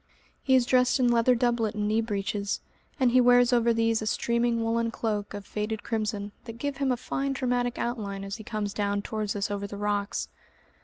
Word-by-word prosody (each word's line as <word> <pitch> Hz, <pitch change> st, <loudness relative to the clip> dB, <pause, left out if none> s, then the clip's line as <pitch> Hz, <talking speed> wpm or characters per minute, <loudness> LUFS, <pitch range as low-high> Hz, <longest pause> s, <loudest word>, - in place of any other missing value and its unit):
He 265 Hz, -, +3 dB
is 255 Hz, -2 st, +4 dB
dressed 250 Hz, +1 st, +3 dB
in 250 Hz, -1 st, +4 dB
leather 235 Hz, +1 st, +4 dB
doublet 235 Hz, -3 st, +1 dB
and 210 Hz, -1 st, -1 dB
knee 220 Hz, +2 st, +2 dB
breeches, 205 Hz, -2 st, -2 dB, 0.4 s
and 255 Hz, -2 st, +4 dB
he 255 Hz, +1 st, +6 dB
wears 245 Hz, 0 st, +5 dB
over 235 Hz, -1 st, +4 dB
these 225 Hz, -1 st, +1 dB
a 215 Hz, -, -3 dB
streaming 235 Hz, +1 st, +1 dB
woollen 230 Hz, 0 st, +1 dB
cloak 210 Hz, -2 st, -3 dB
of 200 Hz, -1 st, -7 dB
faded 210 Hz, +1 st, -3 dB
crimson 210 Hz, -2 st, -2 dB
that 230 Hz, -1 st, -8 dB
give 285 Hz, +2 st, -3 dB
him 275 Hz, -2 st, +1 dB
a 250 Hz, -, +1 dB
fine 275 Hz, +3 st, -2 dB
dramatic 245 Hz, -2 st, -1 dB
outline 205 Hz, -5 st, -3 dB
as 195 Hz, +1 st, -5 dB
he 220 Hz, -, -9 dB
comes 210 Hz, -2 st, -3 dB
down 205 Hz, -1 st, -1 dB
towards 215 Hz, -2 st, -3 dB
us 205 Hz, 0 st, -2 dB
over 200 Hz, 0 st, -3 dB
the 200 Hz, -, -7 dB
rocks. 205 Hz, 0 st, -1 dB
225 Hz, 205 wpm, -27 LUFS, 205-245 Hz, 0.4 s, he